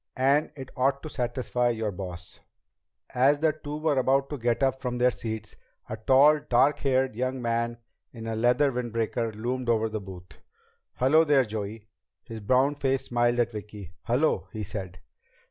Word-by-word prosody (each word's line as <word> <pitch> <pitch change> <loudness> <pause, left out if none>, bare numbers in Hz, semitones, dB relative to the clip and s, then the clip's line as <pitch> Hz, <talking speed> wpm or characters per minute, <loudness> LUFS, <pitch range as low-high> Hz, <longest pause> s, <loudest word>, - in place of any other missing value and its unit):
And 140 +4 +2
it 130 -1 -8
ought 135 +2 +1
to 155 - -6
satisfy 125 -1 -1
your 110 -3 -2
boss." 90 -2 -8 0.7
As 135 +4 +4
the 155 +1 +2
two 150 -1 -7
were 155 -3 +1
about 135 +2 +1
to 145 - -4
get 120 +2 0
up 130 0 +1
from 125 -2 -3
their 125 +1 +3
seats, 110 -2 -6 0.3
a 110 - -3
tall, 135 +7 +5
dark 145 0 +2
haired 130 -3 +1
young 130 +2 -2
man 115 0 -1 0.3
in 115 -2 -9
a 115 0 -3
leather 125 +5 +3
windbreaker 115 -1 -2
loomed 125 +3 -3
over 110 -1 +2
the 110 -1 -4
booth. 90 -2 -12 0.6
"Hello 150 +6 +4
there, 145 -4 +3
Joey!" 110 0 -6 0.4
His 115 -1 -8
browned 130 +7 +1
face 135 -1 0
smiled 120 0 +1
at 120 -1 +1
Vicki. 105 -4 -9
"Hello," 125 +8 +1
he 110 -3 -5
said. 95 -3 -6
120 Hz, 170 wpm, -27 LUFS, 110-135 Hz, 0.7 s, tall